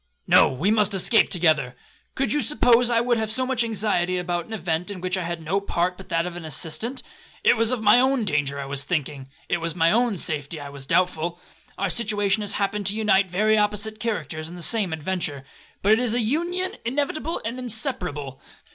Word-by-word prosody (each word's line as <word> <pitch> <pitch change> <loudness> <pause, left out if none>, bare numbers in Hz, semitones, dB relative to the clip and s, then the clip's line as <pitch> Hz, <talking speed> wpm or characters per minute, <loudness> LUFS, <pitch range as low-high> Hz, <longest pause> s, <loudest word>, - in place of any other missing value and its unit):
'No, - - +6
we 155 +11 0
must 210 -2 +2
escape 215 +4 +3
together. 155 -8 +1 0.4
Could 260 -5 0
you 295 - +1
suppose 245 -5 +3
I 230 -1 +3
would 240 -1 +1
have 220 -1 -2
so 255 +3 0
much 255 -2 +1
anxiety 200 -5 0
about 175 -1 -2
an 225 - -7
event, 175 -3 -2
in 200 -2 -5
which 185 +1 -1
I 185 - -2
had 170 -1 -5
no 190 +6 0
part 180 -2 -1
but 195 +1 -13
that 165 -1 0
of 180 -1 -6
an 175 - -7
assistant? 160 - -2 0.4
It - - +5
was 225 -1 +2
of 245 -3 -1
my 210 +3 +6
own 260 -2 +2
danger 145 -4 -1
I 140 - -4
was 140 0 -2
thinking,—it 145 +1 -4
was 165 -1 -2
of - - -14
my 165 0 +4
own 235 -2 +1
safety 155 -1 -3
I 145 -1 -8
was 140 -1 -10
doubtful. 175 -1 0 0.4
Our 195 -1 0
situation 205 -1 +1
has 205 - -2
happened 205 0 -1
to 200 - +1
unite 200 -3 +2
very 215 +4 +2
opposite 210 +1 -1
characters 160 -8 -3
in 175 - -9
the 175 - -7
same 210 -4 +1
adventure, 160 -4 -3 0.4
but 205 - +4
it 220 - +5
is 240 -2 +1
an 245 - +2
union 345 +9 -1
inevitable 290 +6 -2
and 235 +3 -4
inseparable. 180 - -1
195 Hz, 210 wpm, -24 LUFS, 165-225 Hz, 0.4 s, No